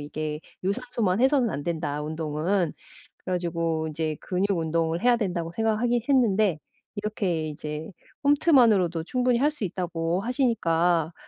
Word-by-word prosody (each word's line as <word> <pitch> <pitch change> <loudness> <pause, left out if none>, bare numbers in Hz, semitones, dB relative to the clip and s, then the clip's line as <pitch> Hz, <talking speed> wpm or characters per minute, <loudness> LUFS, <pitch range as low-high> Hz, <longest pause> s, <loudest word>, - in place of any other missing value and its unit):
이게 150 +1 -4 0.2
유산소만 210 -1 -1
해서는 265 -3 +3
안된다 150 -1 -3
운동은. 160 +3 -1 0.5
그래 185 - -5
가지고 165 -2 -1
이제 155 0 -2
근육 190 0 0
운동을 165 +1 0
해야 245 0 +5
된다고 175 -6 -2
생각하긴 225 +4 +1
했는데 215 - +3 0.4
이렇게 185 -7 -2
이제 150 +1 -6 0.3
홈트만으로도 230 - +4
충분히 250 +4 +1
할 295 +3 +3
수 295 -8 -7
있다고 175 -1 -2
하시니까 175 - +1
180 Hz, 330 characters per minute, -26 LUFS, 160-225 Hz, 0.5 s, 해야